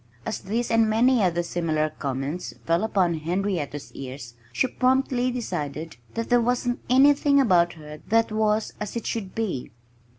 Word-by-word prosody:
As - - -3
these 225 +5 -2
and 225 -1 +4
many 240 +2 +4 0.2
similar 155 -3 -1
comments 140 +3 -4
fell 170 +3 +2
upon 180 -7 +1
Henrietta's 170 -4 -2
ears 130 -2 -8 0.2
she - - +1
promptly 255 0 +1
decided 165 - -4 0.2
that 230 0 -3
there 245 0 +5
wasn't 245 +1 0
anything 280 +2 +5
about 175 -9 +4
her 150 -2 -11
that 225 0 +2
was 215 0 +1
as 210 +1 -5
it 235 - -4
should 200 -5 -4
be. 210 - -2
205 Hz, 145 wpm, -25 LUFS, 160-240 Hz, 0.2 s, there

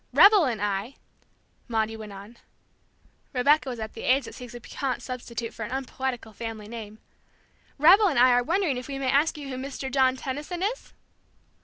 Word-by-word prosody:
"Rebel 400 -4 +7
and 235 -5 -1
I," 205 +5 -2 0.7
Maudie 225 -2 -1
went 215 -2 -9
on, 200 +4 -11 1.0
Rebecca 280 +2 +3
was 245 -2 -5
at 220 0 -5
the 225 - -8
age 265 0 +2
that - - -9
seeks 245 -1 -10
a - - -7
piquant 260 +2 -4
substitute 240 -2 -5
for 225 - -6
an 210 - -5
unpoetical 260 -3 -4
family 220 -1 -6
name, 215 -2 -8 0.8
"Rebel 370 +8 +7
and 315 - 0
I 250 +1 +7
are 245 0 +4
wondering 330 0 0
if 250 - -6
we 275 -1 -4
may 265 -1 0
ask 295 +3 +2
you 285 -2 -7
who 255 - -5
Mr. 265 0 -5
John 260 -1 +3
Tenison 295 +8 -4
is?" 460 +5 -3
255 Hz, 185 wpm, -26 LUFS, 230-280 Hz, 1.0 s, Rebel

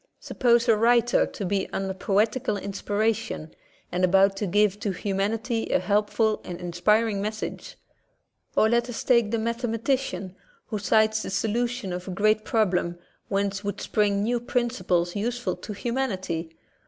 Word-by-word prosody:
Sup - - -10
pose 235 -1 +4
a 225 - +6
writer 235 +2 +3
to 200 - -6
be 195 +1 -1
under 190 0 -2
poetical 210 +5 0
inspiration, 205 -3 -2 0.4
and 180 +1 -1
about 195 +2 +4
to 205 - -2
give 205 +2 +2
to 210 - -2
humanity 210 +5 -1
a - - +3
helpful 215 +1 +1
and 175 -1 -7
inspiring 200 +5 +1
message. 215 +1 -5 0.8
Or 220 - +5
let 235 +2 +1
us 245 - -4
take 235 -4 +3
the 230 - 0
mathe 230 +2 -2
matician 225 -5 -1 0.3
who 215 - -4
sights 220 +1 +3
the - - -5
solution 230 0 -1
of 180 +1 -6
a - - -4
great 215 +1 +3
problem 180 -7 +1 0.3
whence 200 0 -1
would 205 0 -3
spring 205 -1 +1
new 240 +2 +1
principles 235 -8 0
useful 240 +4 -2
to - - -8
humanity. 195 -8 -2
210 Hz, 155 wpm, -26 LUFS, 195-230 Hz, 0.8 s, a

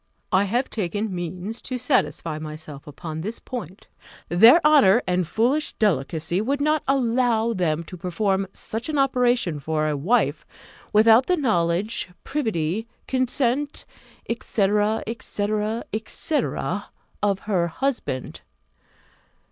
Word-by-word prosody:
I 190 +2 +4
have 240 +6 0
taken 205 0 -3
means 180 +5 -5
to 255 - -4
satisfy 165 - 0
myself 155 -2 -9 0.2
on 160 -1 -4
this 215 +7 -3
point: 200 - -8 0.4
their 225 - +8
honour 250 -8 +6
and 180 -2 0
foolish 260 - +1
delicacy 170 -1 0
would 275 +6 -1
not 305 +1 +2
allow 240 -3 +2
them 170 -5 0
to 180 +2 -10
perform 190 +2 -1
such 225 +8 -6
an 305 - -1
operation 245 - +2
for 155 +1 -1
a 150 - 0
wife, 155 - +1 0.5
without 225 +4 +6
the 360 - +2
knowledge, 195 - 0
privity, 220 - -2 0.2
consent, 260 +2 0 0.4
&c. 230 0 -3
&c. 210 +1 0 0.6
&c. 315 -2 +1 0.8
of 200 -2 +1
her 185 -5 0
husband. 170 - -3
210 Hz, 115 wpm, -24 LUFS, 170-245 Hz, 0.8 s, their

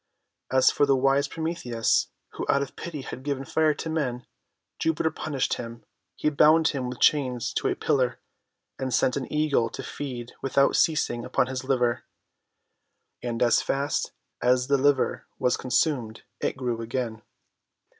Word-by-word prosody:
As 130 0 +5
for 145 - +2
the 135 - +4
wise 135 +2 +2
Prometheus, 160 -9 0 0.2
who - - -6
out 140 - +3
of 140 - -9
pity 160 -4 -6
had 130 - -7
given 135 -1 -3
Fire 155 +1 +2
to 160 - -5
men, 135 -6 -2 0.5
Jupiter 160 0 +1
punished 145 -3 -2
him. 115 -1 -8 0.3
He 150 - 0
bound 155 +2 +5
him 130 -3 -3
with 125 - -7
chains 130 -5 +2
to - - 0
a - - 0
pillar, 125 -3 0 0.6
and 130 -1 -2
sent 125 0 +2
an 140 - -4
Eagle 150 -6 +2
to - - -7
feed 125 -4 -6
without 140 +1 +2
ceasing 135 -7 +1
upon - - +1
his 130 0 -4
liver. 125 -3 +1 1.2
And 120 -1 -1
as 120 -2 +4
fast 140 +1 -1 0.3
as 125 0 +3
the 140 - +4
liver 140 -1 +1
was 125 - +2
consumed, 125 -3 0 0.2
it - - -2
grew 120 -3 -2
again. 115 -1 -3
130 Hz, 155 wpm, -26 LUFS, 125-145 Hz, 1.2 s, As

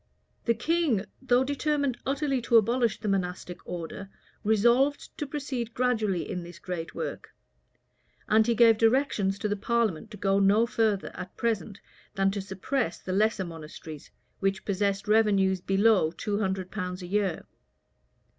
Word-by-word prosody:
The 235 - +3
king, 275 - +1 0.2
though 255 -1 +3
determined 285 -2 -1
utterly 275 -1 0
to 235 0 +4
abolish 235 +2 +2
the 215 - -5
monastic 180 -2 -2
order, 180 +3 -6 0.3
resolved 240 +7 +2
to 295 - -2
proceed 265 -5 -4
gradually 220 -8 0
in 180 -3 -4
this 170 0 -10
great 170 -2 -6
work; - - -6 0.9
and 220 +1 +4
he 235 - +2
gave 225 -1 +6
directions 225 -5 +2
to 210 - -2
the 205 - 0
parliament 220 -2 0
to 210 - -10
go 195 0 +2
no 200 +3 +4
further, 220 -4 0
at 180 0 -9
present, 220 -3 -2 0.3
than 195 -1 +2
to 200 0 -3
suppress 195 +7 -2
the 185 - -5
lesser 215 0 +2
monasteries, 160 -2 -9 0.3
which 195 0 -1
possessed 200 0 -1
revenues 200 -4 +3
below 195 -3 +3
two 205 +5 -3
hundred 190 -3 -2
pounds 180 0 -4
a - - -6
year. 195 -2 -1
210 Hz, 150 wpm, -28 LUFS, 190-235 Hz, 0.9 s, gave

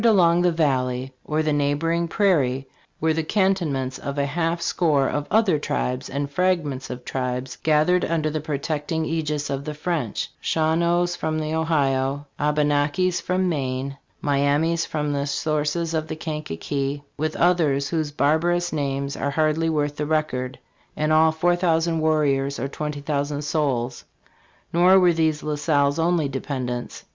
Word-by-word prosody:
31 230 -2 +6
along 170 -1 +4
the 180 0 +3
valley, 130 -5 0
or 150 - -4
over 155 - +2
the 155 - +2
neighboring 155 +4 +1
prairie, 140 - +1 0.3
were 160 0 +2
the 160 - 0
cantonments 160 -9 0
of 140 0 -5
a 140 - +1
half 165 +3 -1
score 155 -5 +2
of 145 0 -2
other 205 -8 +3
tribes, 125 -2 -2
and 140 +1 -3
fragmentsof 145 -9 -1
tribes, 125 0 -3
gathered 155 +4 +3
under 160 -2 0
the 155 0 -2
protecting 155 +2 -2
aegis 150 -3 -2
of 135 0 -2
the 150 +1 -5
French 150 - -2
Shawanoes 170 +2 +1
from 155 0 -2
the 155 0 -2
Ohio, 145 -3 0
Abenakis 150 +4 +1
from 185 0 0
Maine, 135 -3 -2 0.3
Mi 140 -1 +1
amis 160 +4 +1
from 150 -1 -2
the 140 0 -1
sources 155 +3 -1
of 160 -1 -1
the 155 - -4
Kankakee, 145 - -3
with 155 +1 -2
others 155 -6 +2
whose 160 -3 -1
barbarous 165 +5 +1
names 140 -1 -2
are 140 - -1
hardly 155 +2 +1
worth 145 -2 -1
the 150 - -2
record 140 -5 -1 0.4
[in 155 0 0
all 160 0 +5
four 175 +2 +2
thousand 165 -2 +1
warriors, 140 -3 +1
or 135 - -2
twenty 150 +1 -5
thou 140 0 0
sand 145 +1 -4
souls]. 135 -5 -1 0.7
Nor 180 +3 +6
were 180 -2 +5
these 160 -2 +1
La 150 - -1
Salle's 145 0 +2
only 165 -2 +2
dependents. 130 -2 -4
150 Hz, 160 wpm, -23 LUFS, 140-165 Hz, 0.7 s, 31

